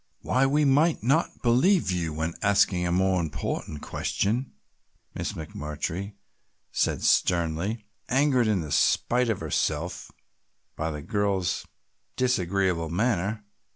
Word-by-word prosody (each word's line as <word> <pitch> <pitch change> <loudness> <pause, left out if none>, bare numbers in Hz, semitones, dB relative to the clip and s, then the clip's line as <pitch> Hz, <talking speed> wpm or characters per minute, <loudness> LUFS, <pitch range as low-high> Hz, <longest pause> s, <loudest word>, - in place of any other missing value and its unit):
"Why 130 +1 +2
we 145 +2 +2
might 145 -1 +3
not 140 +7 +1
believe 130 - +3
you 85 -3 -1
when 80 +2 -3
asking 100 -3 +3
a - - -1
more 95 0 +2
important 75 -1 -4
question," 120 +6 -1 0.6
Miss - - -3
McMurtry 80 +6 -5 0.6
said - - 0
sternly, 90 +6 +1 0.2
angered 130 -2 +3
in 100 -7 +1
spite 125 +9 +2
of 110 - -1
herself 80 +3 -2 0.6
by 80 +1 -2
the 75 -2 -6
girl's 100 -2 -1 0.5
disagreeable 95 -8 0
manner. 105 +2 -1
100 Hz, 115 wpm, -26 LUFS, 85-125 Hz, 0.6 s, might